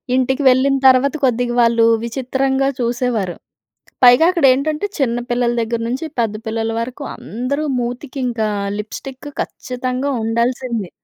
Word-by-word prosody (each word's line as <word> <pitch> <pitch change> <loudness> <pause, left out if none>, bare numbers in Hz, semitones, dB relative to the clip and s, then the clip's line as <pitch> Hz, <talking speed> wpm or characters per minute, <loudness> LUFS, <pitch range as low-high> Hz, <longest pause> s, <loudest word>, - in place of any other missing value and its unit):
ఇంటికి 265 +2 +1
వెళ్ళిన 265 +2 +3
తర్వాత 260 +1 +4
కొద్దిగా 245 -1 0
వాళ్ళు 230 -1 +4 0.2
విచిత్రంగా 265 +2 0
చూసేవారు. 235 -6 -1 0.7
పైగా 245 +6 +7
అక్కడేంటంటే 300 +1 +2
చిన్న 240 -4 +1
పిల్లల 240 0 +1
దగ్గర 230 +1 -2
నుంచి, 260 +7 -3
పెద్ద 220 -2 0
పిల్లల 225 0 -2
వరకు 255 +4 -5
అందరూ 255 +7 -3
మూతికి 250 +3 -4
ఇంకా 225 -3 -1 0.3
లిప్‌స్టిక్ 255 +6 -7 0.2
ఖచ్చితంగా 255 +2 -4
ఉండాల్సిందే. 235 -3 -1
250 Hz, 120 wpm, -18 LUFS, 235-265 Hz, 0.7 s, పైగా